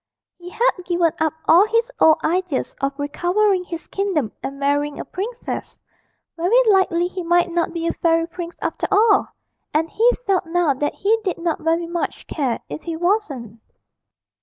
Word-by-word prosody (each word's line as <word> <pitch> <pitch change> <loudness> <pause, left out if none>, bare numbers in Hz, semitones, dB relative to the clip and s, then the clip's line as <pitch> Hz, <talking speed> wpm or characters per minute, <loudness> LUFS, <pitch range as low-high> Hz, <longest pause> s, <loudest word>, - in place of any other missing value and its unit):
He 350 0 -9
had 460 +6 +2
given 345 -2 +1
up 315 -1 +1
all 360 +6 +6
his 460 +2 +1
old 315 0 +6
ideas 355 -3 -1
of 275 0 -1
recovering 360 +7 +1
his 335 -2 -7
kingdom 365 - -1
and 275 - -5
marrying 285 +1 0
a - - -5
princess 460 +6 -5 0.6
very 360 +8 +2 0.2
likely 350 -3 +2
he 365 +1 -4
might 345 +1 +2
not 340 0 0
be 335 -1 -4
a 335 - 0
fairy 330 -1 +2
prince 345 0 -7
after - - -2
all, 415 0 +4 0.5
and 320 +1 +1
he 460 +3 +4 0.2
felt 375 -4 +1
now 335 -3 +2
that 290 +3 -2
he 440 +3 +2
did 375 -4 -2
not 335 -1 -2
very 330 +2 +1
much 340 0 -4
care 265 -7 -2
if - - -7
he 335 -1 -4
wasn't. 320 - -1
345 Hz, 170 wpm, -21 LUFS, 315-380 Hz, 0.6 s, all